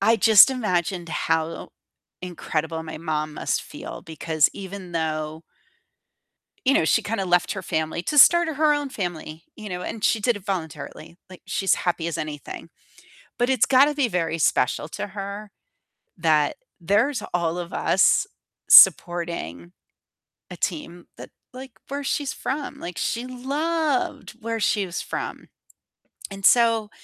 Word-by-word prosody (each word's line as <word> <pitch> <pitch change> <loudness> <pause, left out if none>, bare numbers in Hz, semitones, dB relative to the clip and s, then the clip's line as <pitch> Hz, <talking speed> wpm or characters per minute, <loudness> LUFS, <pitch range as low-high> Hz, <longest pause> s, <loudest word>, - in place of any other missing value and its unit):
I 225 +3 +4
just 220 +1 +7
imagined 180 -7 -2
how 160 0 -2 0.5
incredible 160 -2 -3
my 155 -1 -8
mom 155 -2 -3
must - - -2
feel - - -9
because 160 -1 0
even 190 -2 -9
though 155 -1 -3 1.2
you 275 - +4
know, 330 - +3
she 225 - +3
kinda 205 -2 -3
left 180 0 +2
her 195 - -6
family 160 +1 -2
to 300 - -2
start 345 +4 +7
her 305 -1 +2
own 290 -1 -2
family, 165 -6 -6
you 215 - -9
know, 180 -2 -5
and 220 +3 -6
she 225 - +2
did 235 +3 +1
it 200 -2 -10
voluntarily. 165 -2 -6
Like, 185 - -13
she's 195 - +1
happy 175 -2 -2
as 170 - -3
anything. 155 -2 -7 0.7
But 245 +1 +1
it's 260 -4 +3
gotta 275 +3 +5
be 285 -3 +1
very 165 -5 -2
special 150 -1 +1
to 205 - -5
her 200 +1 -7 0.7
that 155 -4 +2 0.2
there's 210 - +1
all 170 -1 -1
of 175 -1 -6
us - - +3 0.4
supporting 165 - +5 0.8
a 180 - -8
team 170 0 -4
that, - - -11 0.2
like, 260 0 -10 0.2
where 280 +1 -4
she's 280 0 -1
from. 285 +2 -5
Like, 175 0 -7
she 235 +2 -2
loved 285 +3 -2
where 230 0 -3
she 205 -2 +1
was 175 - -5
from. - - -6 0.8
And 195 0 -2
so 230 -3 +4
190 Hz, 145 wpm, -23 LUFS, 165-235 Hz, 1.2 s, just